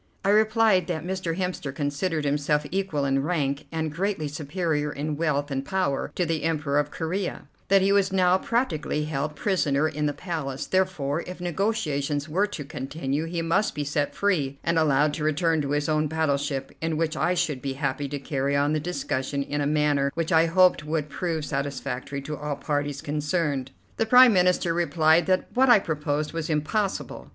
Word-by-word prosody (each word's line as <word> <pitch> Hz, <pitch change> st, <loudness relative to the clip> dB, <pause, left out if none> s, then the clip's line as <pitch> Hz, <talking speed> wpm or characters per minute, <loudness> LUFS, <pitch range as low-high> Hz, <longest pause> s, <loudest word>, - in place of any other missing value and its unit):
I -, -, +3 dB
replied 215 Hz, -2 st, +4 dB
that 165 Hz, -2 st, -3 dB
Mr. 180 Hz, -3 st, -3 dB
Hemster 180 Hz, -6 st, -3 dB
considered 150 Hz, +2 st, -1 dB
himself 150 Hz, +1 st, +1 dB
equal 190 Hz, -7 st, -1 dB
in 135 Hz, 0 st, +1 dB
rank, 145 Hz, -3 st, -1 dB
and 160 Hz, -2 st, -2 dB
greatly 185 Hz, -2 st, -1 dB
superior 150 Hz, 0 st, -2 dB
in 150 Hz, +1 st, -3 dB
wealth 145 Hz, -2 st, -1 dB
and 135 Hz, 0 st, -1 dB
power, 180 Hz, -4 st, -1 dB
to 180 Hz, -, +1 dB
the 165 Hz, -2 st, -1 dB
Emperor 150 Hz, -3 st, 0 dB
of 145 Hz, 0 st, -1 dB
Corea; 175 Hz, +5 st, -3 dB, 0.2 s
that 195 Hz, 0 st, +4 dB
he 195 Hz, -, +3 dB
was 200 Hz, -1 st, +3 dB
now 185 Hz, -1 st, +3 dB
practically 180 Hz, -, -1 dB
held 150 Hz, 0 st, -3 dB
prisoner 155 Hz, -5 st, +1 dB
in 150 Hz, -1 st, -1 dB
the 145 Hz, -, -1 dB
Palace; 145 Hz, -6 st, -4 dB
therefore, 175 Hz, -5 st, 0 dB
if 180 Hz, 0 st, -7 dB
negotiations 155 Hz, -6 st, -1 dB
were 190 Hz, +7 st, +1 dB
to 185 Hz, -8 st, -6 dB
continue, 145 Hz, +1 st, -3 dB
he 165 Hz, 0 st, -3 dB
must 170 Hz, +6 st, +1 dB
be 150 Hz, -, -2 dB
set 145 Hz, 0 st, -1 dB
free, 150 Hz, -9 st, 0 dB
and 170 Hz, -, +2 dB
allowed 150 Hz, -1 st, +3 dB
to 155 Hz, -, -4 dB
return 160 Hz, +1 st, +1 dB
to 140 Hz, -, -3 dB
his 145 Hz, 0 st, 0 dB
own 155 Hz, -1 st, +1 dB
battleship, 145 Hz, -3 st, -1 dB
in 160 Hz, -1 st, -1 dB
which 160 Hz, 0 st, 0 dB
I 180 Hz, +2 st, +1 dB
should 155 Hz, -7 st, -1 dB
be 135 Hz, 0 st, -3 dB
happy 140 Hz, 0 st, -2 dB
to 145 Hz, -, -3 dB
carry 140 Hz, 0 st, -1 dB
on 145 Hz, +1 st, +2 dB
the 155 Hz, -, +1 dB
discussion 140 Hz, -4 st, -2 dB
in 145 Hz, +1 st, -3 dB
a 140 Hz, -, +1 dB
manner 145 Hz, -2 st, +2 dB
which 165 Hz, -1 st, -2 dB
I 165 Hz, 0 st, +5 dB
hoped 180 Hz, -1 st, +4 dB
would 150 Hz, -1 st, -2 dB
prove 160 Hz, -1 st, -2 dB
satisfactory 140 Hz, -1 st, -4 dB
to 150 Hz, +2 st, -4 dB
all 150 Hz, 0 st, -3 dB
parties 145 Hz, -1 st, -2 dB
concerned. 150 Hz, -2 st, -1 dB, 0.3 s
The 225 Hz, -, +1 dB
Prime 250 Hz, 0 st, +8 dB
Minister 180 Hz, -2 st, +3 dB
replied 165 Hz, -1 st, +3 dB
that 185 Hz, -1 st, +2 dB
what 260 Hz, +1 st, +4 dB
I 240 Hz, -, +9 dB
proposed 150 Hz, -4 st, -2 dB
was 165 Hz, -1 st, -3 dB
impossible. 165 Hz, +7 st, -2 dB
155 Hz, 185 wpm, -25 LUFS, 145-180 Hz, 0.3 s, I